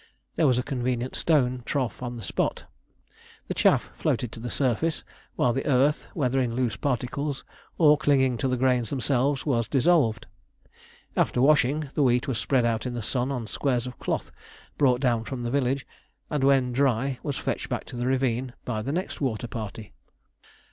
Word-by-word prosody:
There 160 Hz, -, +3 dB
was 125 Hz, -2 st, +3 dB
a 125 Hz, -, 0 dB
convenient 125 Hz, -1 st, -2 dB
stone 130 Hz, -6 st, +2 dB
trough 130 Hz, -4 st, -2 dB
on 120 Hz, -1 st, -4 dB
the 115 Hz, -, -8 dB
spot. -, -, -1 dB, 0.8 s
The -, -, -2 dB
chaff -, -, +3 dB
floated 120 Hz, -, -1 dB
to -, -, -9 dB
the 120 Hz, +2 st, -5 dB
surface, 140 Hz, +6 st, 0 dB, 0.3 s
while 120 Hz, -, +2 dB
the 135 Hz, -, -2 dB
earth, 140 Hz, +2 st, +2 dB
whether 135 Hz, -3 st, +1 dB
in 120 Hz, -2 st, -1 dB
loose 120 Hz, -4 st, 0 dB
particles 140 Hz, +3 st, -2 dB, 0.3 s
or 150 Hz, -2 st, +6 dB
clinging 130 Hz, -5 st, +3 dB
to -, -, 0 dB
the 130 Hz, 0 st, 0 dB
grains 125 Hz, -3 st, +2 dB
themselves, 135 Hz, +1 st, 0 dB
was 120 Hz, -6 st, +1 dB
dissolved. 135 Hz, -6 st, +2 dB, 0.9 s
After -, -, +1 dB
washing, 145 Hz, +1 st, +3 dB
the 150 Hz, -, 0 dB
wheat 125 Hz, +1 st, +3 dB
was 125 Hz, -5 st, -1 dB
spread 130 Hz, -2 st, +2 dB
out 115 Hz, +1 st, 0 dB
in 120 Hz, -, -4 dB
the 120 Hz, -, -4 dB
sun 125 Hz, +4 st, -1 dB
on 125 Hz, -4 st, -3 dB
squares 125 Hz, +2 st, -1 dB
of 125 Hz, -1 st, -8 dB
cloth -, -, -2 dB, 0.4 s
brought 130 Hz, -3 st, +3 dB
down 120 Hz, -4 st, +2 dB
from 125 Hz, +1 st, -5 dB
the 120 Hz, -, -2 dB
village, 135 Hz, 0 st, 0 dB, 0.5 s
and 150 Hz, -3 st, 0 dB
when 135 Hz, -2 st, +4 dB
dry 130 Hz, 0 st, +1 dB
was 145 Hz, -3 st, -3 dB
fetched -, -, -3 dB
back -, -, -3 dB
to -, -, -9 dB
the 120 Hz, +1 st, -2 dB
ravine 130 Hz, -1 st, 0 dB
by 110 Hz, -3 st, -2 dB
the 135 Hz, -, -3 dB
next 180 Hz, +1 st, -3 dB
water 120 Hz, -4 st, -1 dB
party. 110 Hz, -2 st, -7 dB
130 Hz, 180 wpm, -26 LUFS, 120-140 Hz, 0.9 s, or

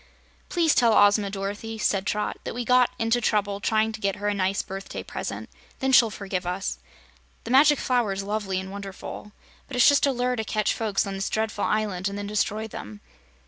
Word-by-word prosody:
"Please 335 Hz, -3 st, +3 dB
tell 235 Hz, -3 st, +4 dB
Ozma, 205 Hz, 0 st, +4 dB
Dorothy," 205 Hz, +3 st, -5 dB
said 195 Hz, -2 st, 0 dB
Trot, 210 Hz, 0 st, -1 dB
"that -, -, -5 dB
we 245 Hz, 0 st, -3 dB
got 250 Hz, +1 st, +4 dB
into 225 Hz, +2 st, +1 dB
trouble 205 Hz, -3 st, 0 dB
trying 220 Hz, +1 st, +1 dB
to 220 Hz, -1 st, -8 dB
get 200 Hz, -1 st, 0 dB
her 205 Hz, 0 st, -4 dB
a -, -, +1 dB
nice 195 Hz, 0 st, 0 dB
birthday 195 Hz, +1 st, -7 dB
present. -, -, -5 dB, 0.3 s
Then 265 Hz, -1 st, 0 dB
she'll 240 Hz, -3 st, +6 dB
forgive 195 Hz, -3 st, -4 dB
us. 180 Hz, -, -3 dB, 0.6 s
The -, -, -6 dB
Magic 290 Hz, +3 st, +6 dB
Flower 245 Hz, -6 st, +1 dB
is 195 Hz, 0 st, -3 dB
lovely 200 Hz, -2 st, -2 dB
and 190 Hz, 0 st, -7 dB
wonderful, 200 Hz, +1 st, -8 dB, 0.4 s
but 275 Hz, -, -7 dB
it's 245 Hz, -, +6 dB
just 285 Hz, 0 st, +5 dB
a -, -, +3 dB
lure 250 Hz, 0 st, 0 dB
to 220 Hz, -, -1 dB
catch 215 Hz, -1 st, 0 dB
folks 215 Hz, -3 st, 0 dB
on 195 Hz, -, -4 dB
this 195 Hz, 0 st, -2 dB
dreadful 220 Hz, -1 st, -1 dB
island 200 Hz, -3 st, -1 dB
and 200 Hz, -, -6 dB
then 205 Hz, -, -4 dB
destroy 210 Hz, +1 st, -1 dB
them. 105 Hz, -, -9 dB
210 Hz, 205 wpm, -25 LUFS, 195-230 Hz, 0.6 s, she'll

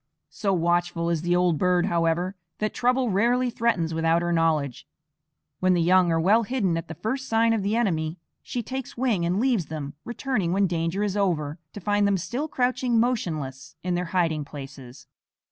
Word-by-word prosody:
So 200 Hz, -2 st, -1 dB
watchful 175 Hz, -1 st, +1 dB
is 165 Hz, -2 st, 0 dB
the 175 Hz, +1 st, +1 dB
old 175 Hz, -4 st, +2 dB
bird, 180 Hz, -1 st, +3 dB
however, 170 Hz, +3 st, 0 dB, 0.2 s
that 215 Hz, 0 st, -2 dB
trouble 250 Hz, -1 st, +1 dB
rarely 240 Hz, +5 st, +2 dB
threatens 205 Hz, -9 st, 0 dB
without 165 Hz, +1 st, +2 dB
her 175 Hz, 0 st, 0 dB
knowledge. 155 Hz, -6 st, 0 dB, 0.7 s
When 185 Hz, 0 st, +3 dB
the 175 Hz, -, +2 dB
young 180 Hz, 0 st, +4 dB
are 165 Hz, -, +2 dB
well 205 Hz, +7 st, +4 dB
hidden 215 Hz, -7 st, 0 dB
at 165 Hz, -, -4 dB
the 160 Hz, -, -7 dB
first 260 Hz, +4 st, -3 dB
sign 225 Hz, 0 st, +3 dB
of 225 Hz, -, 0 dB
the 200 Hz, +3 st, 0 dB
enemy, 165 Hz, -8 st, 0 dB, 0.2 s
she 245 Hz, -, -4 dB
takes 260 Hz, +2 st, -6 dB
wing 225 Hz, -9 st, +1 dB
and 180 Hz, +3 st, 0 dB
leaves 235 Hz, -, +1 dB
them, 150 Hz, -3 st, -5 dB
returning 240 Hz, -7 st, -1 dB
when 195 Hz, +1 st, +3 dB
danger 170 Hz, +2 st, -1 dB
is 205 Hz, -2 st, -1 dB
over 165 Hz, -6 st, 0 dB
to -, -, -7 dB
find 205 Hz, +1 st, +2 dB
them 200 Hz, -1 st, +2 dB
still 240 Hz, -, -3 dB
crouching 250 Hz, -3 st, +1 dB
motionless 155 Hz, -, -2 dB
in 180 Hz, -1 st, -1 dB
their 175 Hz, +1 st, -1 dB
hiding 165 Hz, -4 st, 0 dB
places. 135 Hz, -3 st, -10 dB
180 Hz, 185 wpm, -25 LUFS, 165-225 Hz, 0.7 s, young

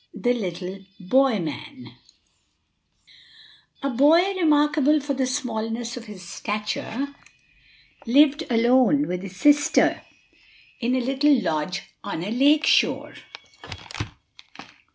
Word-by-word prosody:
THE 245 Hz, 0 st, +1 dB
LITTLE 185 Hz, -3 st, -5 dB, 0.2 s
BOY 255 Hz, +5 st, +2 dB
MAN 195 Hz, -, -7 dB, 1.9 s
|A 275 Hz, -, -1 dB
BOY 320 Hz, +10 st, +4 dB
remarkable 300 Hz, -3 st, +2 dB
for 285 Hz, 0 st, -3 dB
the 260 Hz, -1 st, -1 dB
smallness 235 Hz, -3 st, -3 dB
of 245 Hz, -2 st, -9 dB
his 190 Hz, -5 st, -11 dB
stature 215 Hz, +8 st, -4 dB, 0.9 s
lived 290 Hz, +5 st, +4 dB
alone 255 Hz, +5 st, +3 dB
with 180 Hz, 0 st, -3 dB
his 190 Hz, -1 st, -9 dB
sister 290 Hz, +6 st, +3 dB, 0.8 s
in 245 Hz, +1 st, 0 dB
a 255 Hz, -, 0 dB
little 275 Hz, +2 st, +2 dB
lodge 160 Hz, -1 st, -2 dB, 0.2 s
on 165 Hz, -, -5 dB
a 205 Hz, -, -4 dB
lake 290 Hz, +6 st, +3 dB
shore. -, -, +2 dB
255 Hz, 105 wpm, -23 LUFS, 210-290 Hz, 1.9 s, BOY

